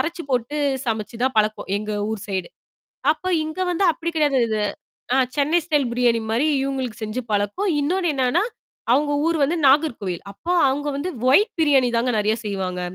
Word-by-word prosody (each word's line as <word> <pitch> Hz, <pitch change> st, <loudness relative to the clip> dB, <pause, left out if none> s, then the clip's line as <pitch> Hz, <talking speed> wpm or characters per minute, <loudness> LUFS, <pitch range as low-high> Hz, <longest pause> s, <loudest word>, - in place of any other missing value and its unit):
அரைச்சு 340 Hz, +2 st, -2 dB
போட்டு 250 Hz, +3 st, -1 dB, 0.3 s
சமைச்சு 225 Hz, 0 st, -3 dB
தான் 260 Hz, 0 st, +1 dB
பழக்கம், 215 Hz, 0 st, 0 dB
எங்க 210 Hz, +1 st, -4 dB, 0.2 s
ஊர் 220 Hz, -3 st, -4 dB
சைடு. 190 Hz, -3 st, -2 dB, 0.6 s
அப்ப 370 Hz, +4 st, -3 dB
இங்க 315 Hz, +2 st, -6 dB
வந்து 350 Hz, +3 st, 0 dB
அப்டி 330 Hz, +1 st, -4 dB
கிடையாது 290 Hz, -4 st, +2 dB
இது. 215 Hz, -1 st, -1 dB, 0.5 s
ஆ -, -, +3 dB, 0.2 s
சென்னை 300 Hz, +4 st, +3 dB
ஸ்டைல் 295 Hz, -4 st, +1 dB
பிரியாணி 240 Hz, -2 st, +2 dB
மாரி 240 Hz, +7 st, +1 dB, 0.2 s
இவங்களுக்கு 260 Hz, -4 st, -3 dB
செஞ்சு 215 Hz, +4 st, -3 dB
பழக்கும். 205 Hz, -, 0 dB
இன்னொன்னு 345 Hz, +3 st, 0 dB
என்னன்னா, 265 Hz, +7 st, +2 dB, 0.5 s
அவங்க 290 Hz, +2 st, +2 dB
ஊர் 330 Hz, -1 st, +1 dB
வந்து 330 Hz, +5 st, 0 dB
நாகர்கோவில். 255 Hz, -, +2 dB
அப்போ 335 Hz, -, -4 dB, 0.2 s
அங்க 290 Hz, +2 st, -2 dB
வந்து 330 Hz, +6 st, -3 dB, 0.2 s
ஒயிட் 410 Hz, -, +4 dB
பிரியாணி 275 Hz, -5 st, +4 dB
தாங்க 245 Hz, +2 st, +1 dB
நெறையா 215 Hz, +1 st, +1 dB
செய்வாங்க. 190 Hz, -3 st, -3 dB
265 Hz, 165 wpm, -22 LUFS, 220-310 Hz, 0.6 s, ஒயிட்